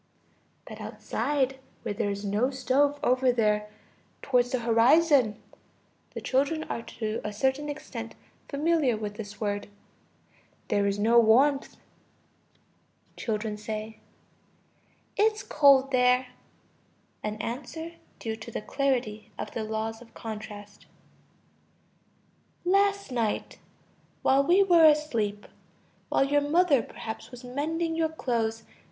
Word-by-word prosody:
But - - -9
outside, 270 -2 -2 0.2
where - - -2
there 205 0 -1
is 200 +1 -4
no 210 +6 +1
stove, 280 +2 +1
over 255 0 +3
there, 210 -3 +1 0.5
towards 250 -2 +2
the 255 -1 -1
horizon 240 0 +4 0.8
(the - - -4
children 285 +4 0
are 230 - -4
to 220 -1 -4
a 210 - -3
certain 265 +7 0
extent 265 -6 -7 0.3
familiar 295 -4 +1
with 210 -1 -4
this 205 -1 -9
word), 205 -1 -2 1.0
there 200 0 +2
is 200 0 0
no 230 +3 +5
warmth. 265 +5 +3 1.4
Children. 215 -1 -3 1.6
It's 430 +1 +2
cold 275 -2 +5
there 250 0 +3 0.9
(an 210 0 -3
answer 280 +9 -5 0.3
due 225 -1 -4
to 220 +1 -9
the 230 - -4
clarity 255 -6 -1
of - - -5
the 225 - -3
laws 220 +1 -3
of 235 - -16
contrast). 210 -2 -8 1.8
Last 400 -2 +2
night... 230 -4 -2 0.6
while 270 +1 +4
we 360 +7 +5
were 345 -4 +6
asleep, 235 -10 +2 0.6
while 275 - +3
your 290 +1 +2
mother 295 -2 +3
perhaps 220 0 -8
was 250 0 -11
mending 320 +6 -2
your 325 -1 +1
clothes 230 -7 -2
250 Hz, 115 wpm, -27 LUFS, 220-290 Hz, 1.8 s, were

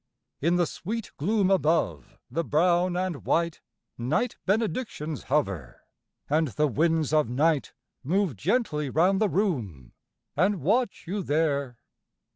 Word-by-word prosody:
In 170 +4 +2
the 175 -1 +3
sweet 220 +7 -5
gloom 195 +4 +1
above 155 - +1
the 165 - -1
brown 175 +3 +2
and 180 -5 -2
white 170 -1 0 0.4
Night 155 - 0
benedictions 205 - -1
hover; 130 - -1 0.5
and 155 +2 +2
the 150 +4 0
winds 155 +2 +1
of 150 -6 +3
night 145 +4 +1 0.3
Move 180 - +1
gently 150 - 0
round 185 - +2
the 215 - +3
room, 115 - -2 0.4
and 185 +5 +2
watch 215 - 0
you 200 +3 -2
there. 145 -6 0
165 Hz, 125 wpm, -27 LUFS, 145-190 Hz, 0.5 s, the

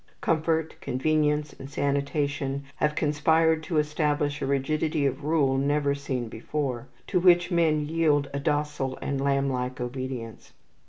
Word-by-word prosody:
Comfort, 160 0 0
convenience, 150 +2 0
and 135 - -8
sanitation 140 0 -1
have 150 0 +1
conspired 160 +2 +2
to 160 0 -2
establish 150 -1 0
a - - -1
rigidity 150 +2 0
of 135 +2 -1
rule 140 -4 +2
never 145 +1 +1
seen 135 -4 -3
before, 125 +2 -3 0.2
to - - +1
which 175 0 +4
men 160 -3 +2
yield 150 -3 +2
a 140 - -1
docile 145 -2 -1
and 140 -1 -2
lamblike 135 -2 0
obedience. 125 -2 -6
145 Hz, 130 wpm, -26 LUFS, 135-155 Hz, 0.2 s, which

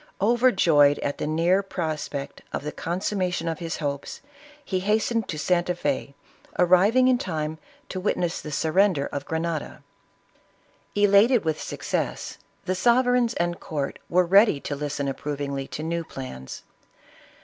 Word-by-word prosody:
Overjoyed 190 - +4
at 145 - -2
the - - -2
near 170 +5 +2
prospect 155 -7 -4
of - - -4
the 150 - -3
consummation 180 -1 -2
of 165 -1 -2
his 165 -1 -4
hopes, 140 -2 -4 0.5
he 185 - -1
hastened 220 +3 0
to 155 - -4
Santa 175 +2 +1
Fe", 140 -3 -2 0.4
arriving 195 +8 +5
in 255 -1 +3
time 155 -4 -3 0.3
to 185 - -4
witness 180 -3 -1
the 150 - -7
surrender 160 0 +2
of 140 0 -5
Grenada. 160 -1 -3 1.1
Elated 205 +2 +5
with 160 -1 -1
success, - - -3 0.3
the 185 - 0
sovereigns 245 +3 +3
and 175 0 -1
court 145 -3 -4
were 180 +1 +3
ready 195 -3 +5
to 145 - -4
listen 145 -1 -3
approvingly 140 -1 -3
to 155 - -6
new 170 +1 -2
plans. 130 - -8
170 Hz, 140 wpm, -25 LUFS, 150-195 Hz, 1.1 s, arriving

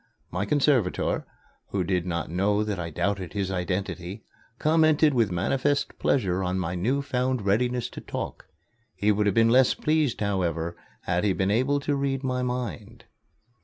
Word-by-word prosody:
My 90 +4 -1
conservator, 130 -5 +1 0.4
who 95 -2 -1
did 90 0 -1
not 85 -2 -3
know 100 +4 +1
that 105 -4 -3
I 85 -1 -3
doubted 95 +3 -2
his 100 -2 -2
identity, 95 +2 -3 0.3
commented 155 -1 +4
with 115 -5 +2
manifest 135 +11 0
pleasure 95 -8 +1
on 90 0 -1
my 90 -2 -2
new 125 +11 0
found 130 -3 -1
readiness 120 +4 +1
to - - -9
talk. - - -6 0.5
He 105 +1 +2
would 105 0 +1
have 100 - +1
been 115 0 +5
less 130 +1 +5
pleased, 155 -4 +1
however, 85 -5 -1 0.3
had 90 +1 0
he 100 -2 +2
been 95 +1 0
able 130 +6 +2
to 145 0 0
read 135 -1 -1
my 130 -1 -1
mind. 125 -9 -4
105 Hz, 165 wpm, -26 LUFS, 90-130 Hz, 0.5 s, been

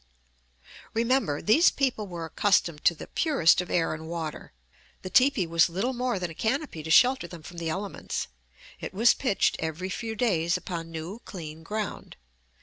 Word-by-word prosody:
Remember, 230 - +1
these 290 - +6
people 250 -7 -1
were 170 -3 -6
accustomed 170 -2 +1
to 170 - +5
the - - -8
purest 275 - +3
of 180 - -8
air 165 -2 +1
and 160 0 -7
water. 165 -2 -5 0.5
The 185 - -6
teepee 255 -8 +4
was 165 +2 +3
little 195 +10 -1
more 250 -2 -1
than 175 -2 -3
a - - -8
canopy 240 - -2
to 155 - -7
shelter 250 +3 +5
them 170 -2 -11
from 175 +2 -11
the 165 -1 -3
elements; 190 +4 -4 0.5
it - - -7
was 230 +4 +5
pitched 230 -8 +1
every 160 +4 -3
few 225 +3 -4
days 175 -7 +1
upon 170 -2 -6
new, 165 +6 -6
clean 160 -8 -9
ground. 210 +5 -5
180 Hz, 170 wpm, -27 LUFS, 165-230 Hz, 0.5 s, these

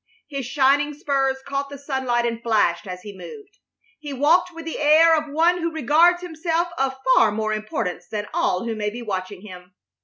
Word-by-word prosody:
His 275 -4 -5
shining 285 +2 +2
spurs 270 -2 -1
caught 280 0 -3
the 280 - -8
sunlight 260 -4 -1
and 230 -1 -3
flashed 200 -7 +1
as 180 0 -7
he 205 -1 -9
moved. 415 - -12 0.4
He 295 -2 -7
walked 305 +7 +3
with 330 -1 -10
the 325 - -5
air 315 +2 +6
of 305 -2 -3
one 335 +4 +2
who 335 0 -2
regards 320 +4 +3
himself 335 0 -2
of 270 -2 -1 0.2
far 220 -2 +5
more 215 0 -2
importance 215 -4 -4
than 210 +1 -4
all 180 - 0
who 230 - -2
may 210 -1 -2
be 240 +3 -8
watching 190 -2 -5
him. 180 -2 -12
270 Hz, 190 wpm, -22 LUFS, 215-315 Hz, 0.4 s, air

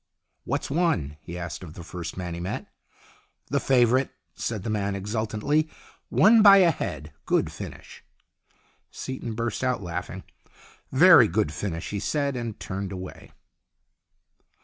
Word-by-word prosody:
"What's - - -2
won?" 145 - 0
he 85 +3 -8
asked 90 -1 -6
of 80 -2 -10
the 85 - -8
first 90 +1 -7
man 90 -2 -4
he 85 - -5
met. 90 +2 -4 0.9
"The - - +2
favourite," 130 0 +3 0.2
said 110 -5 -4
the 115 - -3
man, 100 -2 -1
exultantly. 110 +9 -1 0.2
" - - -28
Won 220 +3 +6
by 200 -1 +9
a 180 -3 +6
head. 75 - -5
Good - - +1
finish." - - -10 0.9
Seaton 125 -4 -6
burst 115 +1 -2
out 125 -5 0
laughing. 85 -1 -5 0.4
" - - -21 0.3
Very - - +8
good 75 - 0
finish," 85 0 -4
he 100 - -2
said, 140 +5 -1
and 115 -3 -5
turned 95 0 -5
away. 95 -1 -8
105 Hz, 150 wpm, -26 LUFS, 90-130 Hz, 0.9 s, by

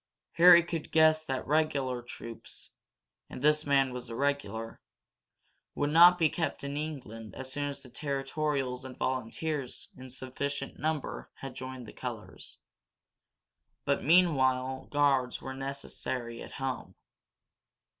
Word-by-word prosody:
Harry 170 0 +8
could 165 -2 -4
guess 155 0 +5
that 135 -4 -3
regular 140 -4 +1
troops 115 -1 -8 0.6
and 125 - -8
this 150 0 +3
man 135 -2 +3
was 125 -1 -6
a 115 - -5
regular 140 -5 -2 0.9
would 145 0 0
not 175 +3 +8
be 165 -3 +4
kept 160 -1 -2
in 140 0 -3
England 130 -8 -6
as 130 0 -5
soon 145 +1 -1
as 140 0 -6
the 130 - -12
territorials 140 -2 -2
and 130 -1 -9
volunteers 130 +2 -2
in 130 0 -10
sufficient 135 +2 -4
number 155 -1 -2
had 135 -1 -7
joined 130 -1 -7
the - - -11
colors. - - -5 1.3
But 140 - +1
meanwhile 130 -6 +3
guards 140 -3 +2
were 130 - -6
necessary 130 -3 -4
at - - -9
home. 135 -1 -4
135 Hz, 130 wpm, -30 LUFS, 130-150 Hz, 1.3 s, Harry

